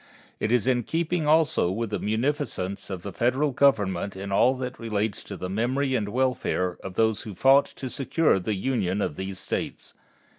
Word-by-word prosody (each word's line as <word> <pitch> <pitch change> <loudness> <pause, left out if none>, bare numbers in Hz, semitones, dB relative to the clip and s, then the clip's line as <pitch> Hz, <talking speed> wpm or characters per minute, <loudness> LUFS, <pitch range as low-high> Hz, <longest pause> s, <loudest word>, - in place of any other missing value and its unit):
It 110 - -1
is 120 -2 +3
in 125 -2 +2
keeping 165 +4 -1
also 155 - +3
with 110 +3 -3
the - - -1
munificence 110 - -2
of 95 -3 -5
the 100 - -6
Federal 130 +7 +1
Government 100 -9 +2
in 100 +1 -6
all 125 +6 +4
that 125 -1 -5
relates 110 -2 -2
to 100 - -7
the 90 - -4
memory 130 +8 0
and 110 -5 0
the - - -5
welfare 125 -8 0
of 95 -1 -7
those 110 -1 +2
who 105 -3 -8
fought 135 +7 +5
to 130 - -5
secure 140 -1 +1
the 100 +3 -2
Union 95 -3 -1
of - - -2
these 95 +2 -5
States. - - -4
115 Hz, 190 wpm, -26 LUFS, 100-130 Hz, -, fought